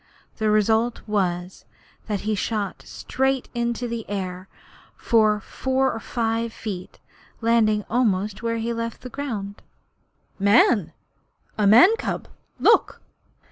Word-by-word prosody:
The 220 -1 +1
result 220 +3 +2
was 180 -3 -2 0.4
that 205 -3 -2
he 215 +1 -1
shot 205 -1 -2
up - - -18
straight 265 0 -1
into 235 0 -2
the 230 -1 -4
air 185 -2 -4 0.5
for 215 -2 +3
four 265 +4 -1
or 225 - -5
five 230 0 -2
feet, 200 -5 -7 0.4
landing 220 -2 +2
almost 210 -4 0
where 230 -1 -1
he 230 +1 -2
left 230 0 -5
ground. 215 -8 -5 0.8
'Man!' 200 +3 +5
he 220 -6 +5
snapped. - - -24 0.6
'A 205 - +4
man's 355 - +7
cub. - - -3 0.3
Look!' - - +3
220 Hz, 130 wpm, -23 LUFS, 205-235 Hz, 0.8 s, man's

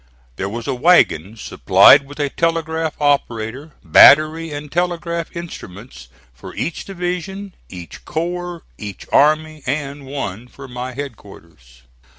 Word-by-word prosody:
There 95 - -3
was 115 +2 -6
a - - -2
wagon, 120 - +2
supplied 140 +5 +5
with 145 +2 -12
a 145 -2 -1
telegraph 165 -1 -1
operator, 140 -1 -1
battery 155 +2 +6
and 145 0 -7
telegraph 170 -1 -3
instruments 105 - -10 0.3
for - - -12
each 170 - -4
division, 190 +1 -5 0.2
each 90 -2 -11
corps, 175 +1 -4 0.2
each 100 -2 -8
army, 155 +1 +2
and 140 0 -4
one 120 -5 -6
for 135 +2 -12
my 125 0 -6
headquarters. 85 - -11
145 Hz, 125 wpm, -19 LUFS, 115-165 Hz, 0.3 s, battery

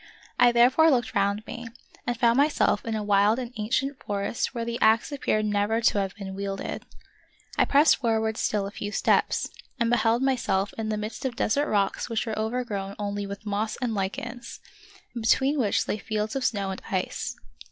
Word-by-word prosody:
I 245 - +7
therefore 255 +7 +5
looked 245 -5 +1
round 200 +2 0
me, 235 -1 -7 0.4
and 240 -1 -1
found 235 -1 +4
myself 285 -6 +2
in 225 -1 -2
a 215 - -2
wild 205 +2 +3
and 250 -1 -5
ancient 260 +6 -1
forest 200 +2 -2
where 235 -3 -4
the 235 0 -3
axe 220 +5 +4
appeared 215 -6 0
never 210 +2 +1
to 225 -3 +3
have 195 -1 -2
been 195 -2 -7
wielded. 195 0 -4 0.7
I - - +3
pressed 290 +3 +5
forward 220 -3 0
still 210 -2 0
a 200 - -5
few 205 0 -5
steps, - - +1 0.3
and 235 0 +2
beheld 240 0 +2
myself 205 -7 0
in 220 -1 -3
the 215 - -1
midst 215 +1 -5
of 260 -3 -2
desert 285 +8 +1
rocks 200 +2 0
which 225 0 -1
were 220 -2 -3
overgrown 220 -4 -3
only 205 -1 -3
with 200 +2 -8
moss 210 +1 -1
and 240 -3 -1
lichens, 230 +5 -4 0.5
and 235 - -5
between 270 +6 +3
which 210 -6 +1
lay 215 - -2
fields 215 +1 -3
of 270 - -1
snow 200 -5 0
an.d 190 - -7
ice. 185 -2 -2
220 Hz, 190 wpm, -26 LUFS, 205-240 Hz, 0.7 s, I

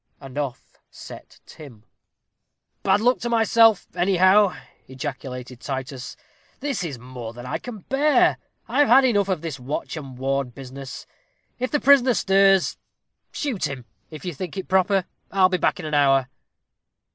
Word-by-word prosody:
And 135 -2 -11
off 145 -4 -5
set - - -12
Tim. 125 -9 -13 1.0
"Bad 210 - +2
luck 250 +3 +3
to 240 - -3
myself, 225 -2 +4
anyhow," 185 +2 +4 0.3
ejaculated 130 -2 -7
Titus; 130 0 -6 0.4
"this 275 -9 -2
is 150 -7 -5
more 120 -2 -8
than 120 +1 -10
I 125 - -3
can 230 -5 -9
bear 285 - +2 0.3
I've 290 -1 +3
had 260 +3 +6
enough 205 -5 +2
of 180 -5 -1
this 160 -5 -5
watch 135 +6 -4
and 135 -5 -8
ward 135 -1 -2
business 135 0 -9 0.5
if 255 +1 -1
the 295 - +1
prisoner 265 -3 +5
stirs, 195 -1 +3 0.5
shoot 265 -10 -2
him, 130 -3 -7 0.2
if 155 +2 -10
you 175 - -3
think 185 +5 -6
proper 190 0 +2 0.2
I'll 185 -1 +4
be 185 -1 0
back - - +1
in 170 - -6
an 155 - -5
hour." 135 -3 +3
170 Hz, 150 wpm, -23 LUFS, 135-205 Hz, 1.0 s, had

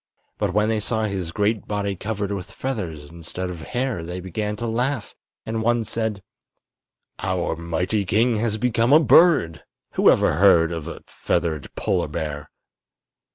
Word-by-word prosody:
But 105 -3 0
when 105 0 +3
they 110 -1 +1
saw 110 +1 -1
his 95 -5 -2
great 105 +3 0
body 100 -1 -2
covered 100 +1 -3
with 100 -1 -4
feathers 85 - -5
instead 85 +2 -5
of 85 - -7
hair 125 -3 -2
they 90 +2 -5
began 105 +4 -3
to 115 - -5
laugh, 120 +2 -1 0.3
and 110 0 -2
one 120 +1 +2
said: 110 -2 -3 1.0
"Our - - -1
mighty 85 +5 -1
king 110 +4 +2
has 110 -1 0
become 120 +2 +2
a 155 - +9
bird! 155 - +5 0.3
Who - - +4
ever - - +4
before 80 - -1
heard 85 -4 +5
of 80 -2 -5
a 85 - -8
feathered 80 -5 -2
polar - - 0
bear?" 75 -2 -5
105 Hz, 160 wpm, -23 LUFS, 85-115 Hz, 1.0 s, a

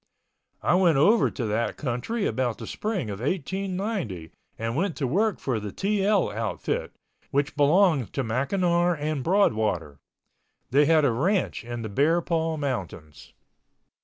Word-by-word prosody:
I - - +3
went 180 -5 +4
over 205 +11 +4
to 125 - -4
that 110 +2 -1
country 150 - -2
about 125 -4 -1
the - - -7
spring 195 - -3
of 100 - -6
1890 185 - -3 0.3
and 115 +1 -3
went 170 +3 0
to 140 - -2
work 200 - +1
for 125 -5 -1
the 105 -1 -6
TL 200 - +1
outfit, 110 0 -3 0.4
which 140 +1 0
belonged 150 - +3
to 135 - -1
McNamar 170 - +1
and 150 -2 -2
Broadwater. 110 - +1 0.7
They 145 +3 +5
had 155 -2 +4
a 130 - +3
ranch 175 - 0
in 120 0 -5
the - - -3
Bear 150 +11 +2
Paw 165 -2 -1
Mountains. 90 - -5
145 Hz, 145 wpm, -26 LUFS, 115-185 Hz, 0.7 s, They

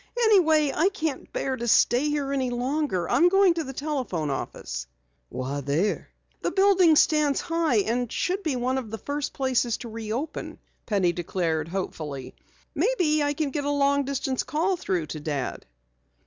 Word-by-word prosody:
"Anyway, 320 - +4
I 350 +5 +3
can't 320 -9 -4
bear 265 - -2
to 240 -1 -4
stay 245 +5 +4
here 290 -2 -1
any 260 -2 0
longer. 245 - -1
I'm 350 - +4
going 390 -1 +5
to 335 -1 -2
the 265 - -6
telephone 260 - -2
office." 65 - -5 0.4
"Why 135 +3 -4
there?" 150 +9 -1 0.3
"The - - 0
building 385 -4 +5
stands 300 -2 +3
high 330 -9 +1
and 240 +1 -1
should 370 +2 -1
be 310 -8 -1
one 255 +2 0
of 235 -4 -8
the 225 - -5
first 285 +4 -3
places 255 -3 0
to 235 - -8
reopen," 230 +7 -5 0.3
Penny 190 -5 +2
declared 165 -2 -2
hopefully. 155 -7 -5 0.4
"Maybe 325 - +2
I 290 0 0
can 295 -2 -1
get 290 +1 -2
a 285 - -1
long 280 0 +2
distance 270 -1 -1
call 340 +5 0
through 185 - -2
to 155 +1 -6
Dad." 145 - -4
270 Hz, 165 wpm, -26 LUFS, 210-310 Hz, 0.4 s, going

